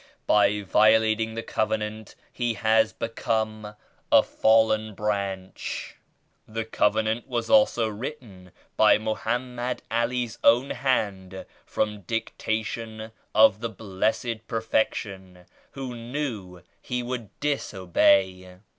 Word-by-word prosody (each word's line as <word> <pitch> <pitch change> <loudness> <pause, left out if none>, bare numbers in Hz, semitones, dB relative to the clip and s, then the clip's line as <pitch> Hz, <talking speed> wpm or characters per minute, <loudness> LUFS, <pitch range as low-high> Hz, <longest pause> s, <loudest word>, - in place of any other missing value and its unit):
By 105 0 +3
violating 110 +2 +3
the 115 - -4
Covenant 110 -1 -3 0.2
he 120 -2 -1
has 110 +1 +3
become 110 -2 -3 0.4
a - - +7
fallen 110 -1 +2
branch. 100 -2 -4 0.5
The 110 +1 -4
Covenant 110 +1 0
was 120 -2 -3
also 265 - +4
written 110 -5 -8 0.3
by - - +6
Mohammed 120 +3 -3
All's 120 0 -1
own 120 +4 +4
hand 100 -8 -2 0.2
from 105 -1 -2
dictation 110 +1 -4 0.2
of 110 -1 +6
the 115 0 -3
Blessed 110 +2 -2
Perfection 100 -5 -2 0.3
who 135 -2 -6
knew 115 -8 -5 0.2
he 125 0 -3
would 120 -4 -5
disobey. 95 -8 +1
110 Hz, 100 wpm, -25 LUFS, 105-115 Hz, 0.5 s, a